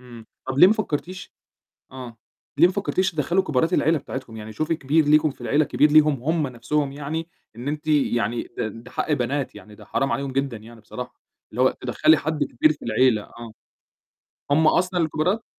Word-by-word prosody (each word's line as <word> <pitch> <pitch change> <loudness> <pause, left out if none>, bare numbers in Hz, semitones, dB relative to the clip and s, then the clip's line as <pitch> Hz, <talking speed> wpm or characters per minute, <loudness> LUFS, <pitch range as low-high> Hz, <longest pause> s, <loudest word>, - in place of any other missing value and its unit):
إمم، 120 -3 -13 0.2
طب 130 +1 -3
ليه 180 - +9
ما 195 - +5
فكّرتيش 185 -3 -4 0.6
آه، 125 -3 -9 0.4
ليه 175 - +7
ما 185 - -4
فكّرتيش 190 -1 0
تدخّلي 170 +3 +1
كبارات 160 -3 0
العيلة 160 +2 +3
بتاعتكم؟ 130 -4 -7
يعني 110 0 -8
شوفي 155 +6 -1
كبير 155 +2 +1
ليكم 150 0 +4
في - - -18
العيلة، 150 +1 +2
كبير 145 +5 +2
ليهم 150 -1 +5
هُم 160 -1 0
نَفْسهم 135 +3 -2
يعني، 150 +3 -5 0.3
إن 120 +4 -7
أنتِ 150 +1 -4
يعني 120 -6 +1
ده - - -1
ده 115 +3 -11
حق - - -2
بنات 140 0 -1
يعني 105 -1 -13
ده 105 - -15
حرام 135 +6 -1
عليهم 140 -1 -2
جدًا 135 -3 -2
يعني 115 +2 -14
بصراحة، 125 +3 -8 0.4
اللي 120 - -2
هو 130 - +5
تدخّلي 130 +5 +3
حد 155 -2 -1
كبير 155 +6 +2
في - - -13
العيلة، 115 -1 +2
آه، 115 +1 -11 1.0
هُم 155 +2 +4
أصلًا 180 +2 +2
الكبارات؟! 165 +7 0
140 Hz, 190 wpm, -23 LUFS, 125-155 Hz, 1.0 s, ليه